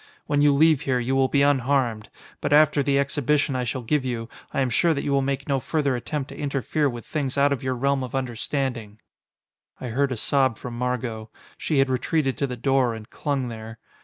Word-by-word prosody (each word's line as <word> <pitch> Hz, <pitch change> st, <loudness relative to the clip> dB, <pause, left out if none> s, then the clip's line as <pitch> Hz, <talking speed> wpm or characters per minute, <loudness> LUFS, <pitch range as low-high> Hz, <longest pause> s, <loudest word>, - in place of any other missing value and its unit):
When 145 Hz, -1 st, +1 dB
you 145 Hz, 0 st, +5 dB
leave 155 Hz, 0 st, +4 dB
here, 130 Hz, -2 st, 0 dB
you 125 Hz, +2 st, -1 dB
will 135 Hz, 0 st, +3 dB
be 140 Hz, +1 st, +2 dB
unharmed 130 Hz, -5 st, +1 dB, 0.3 s
but -, -, -2 dB
after 150 Hz, 0 st, +5 dB
the 140 Hz, 0 st, +1 dB
exhibition 140 Hz, +1 st, +1 dB
I 125 Hz, -, 0 dB
shall 125 Hz, +1 st, -3 dB
give 145 Hz, +4 st, +1 dB
you, 120 Hz, -3 st, -4 dB, 0.2 s
I 140 Hz, -, 0 dB
am 130 Hz, -2 st, 0 dB
sure 165 Hz, +7 st, +3 dB
that 140 Hz, -, -3 dB
you 145 Hz, -, -1 dB
will 140 Hz, 0 st, +3 dB
make 135 Hz, 0 st, -2 dB
no 135 Hz, -2 st, +1 dB
further 140 Hz, +1 st, 0 dB
attempt 135 Hz, +4 st, -4 dB
to -, -, -9 dB
interfere 145 Hz, +1 st, -1 dB
with 120 Hz, -2 st, -7 dB
things 140 Hz, -4 st, -3 dB
out 140 Hz, 0 st, +4 dB
of 140 Hz, -, -4 dB
your 130 Hz, -1 st, -1 dB
realm 140 Hz, +1 st, 0 dB
of 130 Hz, 0 st, -6 dB
understanding." 120 Hz, -3 st, -3 dB, 0.8 s
I 125 Hz, -, -5 dB
heard 135 Hz, +4 st, 0 dB
a 125 Hz, -, -2 dB
sob 130 Hz, -1 st, +2 dB
from 120 Hz, -1 st, -7 dB
Margot. 120 Hz, -3 st, -3 dB, 0.3 s
She 155 Hz, -, -1 dB
had 135 Hz, -1 st, +3 dB
retreated 135 Hz, +2 st, 0 dB
to 140 Hz, -, 0 dB
the 125 Hz, -1 st, -5 dB
door, 130 Hz, -2 st, +1 dB
and 110 Hz, 0 st, -11 dB
clung 140 Hz, -4 st, -2 dB
there. 110 Hz, 0 st, -8 dB
135 Hz, 220 wpm, -24 LUFS, 125-140 Hz, 0.8 s, you